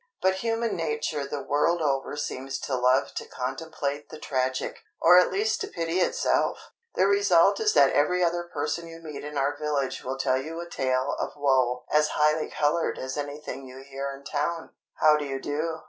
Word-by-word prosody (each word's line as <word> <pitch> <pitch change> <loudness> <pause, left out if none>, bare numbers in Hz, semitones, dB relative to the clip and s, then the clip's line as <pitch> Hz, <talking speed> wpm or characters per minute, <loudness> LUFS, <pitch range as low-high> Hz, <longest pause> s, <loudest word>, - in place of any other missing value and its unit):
But 190 0 +2
human 230 +2 -1
nature 150 -3 -2
the 140 0 -4
world 150 +4 +2
over 140 -2 -1
seems 135 -2 -4
to 135 - -2
love 130 +2 +2
to - - -5
contemplate 145 +2 -4
the 155 - -9
tragic, 130 -3 -2 0.2
or 175 +2 +8
at 180 - +3
least 210 +3 0
to - - -2
pity 165 +1 -2
itself! - - 0 0.2
The 185 - +4
result 200 -1 +4
is 215 -1 +2
that 140 -1 +6
every 180 +5 +2
other 175 0 0
person 165 +3 -2
you 165 0 -10
meet 155 -3 -8
in 150 0 -6
our 140 +1 +1
village 145 -3 -2
will 130 +1 -3
tell 130 -1 +1
you 160 +4 -6
a 170 - -6
tale 130 -3 0
of - - -3
woe 130 -3 +2
as 150 0 +3
highly 150 +1 +2
coloured 150 +3 0
as 130 0 -4
anything 145 -1 -5
you 130 +1 -11
hear 140 0 -5
in 140 0 -10
town. 160 +4 -2 0.2
"How 155 -1 +5
do 150 - -3
you 135 -1 -3
do?" 155 +4 -2
150 Hz, 195 wpm, -26 LUFS, 135-165 Hz, 0.2 s, or